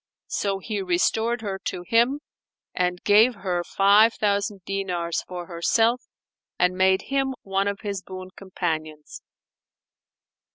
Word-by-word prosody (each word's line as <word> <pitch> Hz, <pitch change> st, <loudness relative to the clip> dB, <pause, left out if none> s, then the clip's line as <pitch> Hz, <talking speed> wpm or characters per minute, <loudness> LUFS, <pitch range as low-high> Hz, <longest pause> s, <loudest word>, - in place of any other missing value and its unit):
So 200 Hz, -1 st, 0 dB
he 205 Hz, +1 st, -4 dB
restored 220 Hz, +6 st, +1 dB
her 195 Hz, -3 st, -4 dB
to 175 Hz, -, -3 dB
him 240 Hz, +5 st, +2 dB, 0.5 s
and 180 Hz, 0 st, -1 dB
gave 220 Hz, +4 st, +5 dB
her 180 Hz, -3 st, -2 dB
five 205 Hz, +5 st, +4 dB
thousand 200 Hz, -1 st, -1 dB
dinars 180 Hz, -4 st, -2 dB
for 180 Hz, -1 st, -6 dB
herself 225 Hz, +8 st, +1 dB, 0.6 s
and 180 Hz, +1 st, +2 dB
made 190 Hz, 0 st, +3 dB
him 270 Hz, -1 st, +1 dB
one 195 Hz, 0 st, 0 dB
of 200 Hz, -1 st, -3 dB
his 200 Hz, -3 st, -4 dB
boon 185 Hz, 0 st, -9 dB
companions. 155 Hz, -5 st, -5 dB
195 Hz, 125 wpm, -24 LUFS, 180-215 Hz, 0.6 s, gave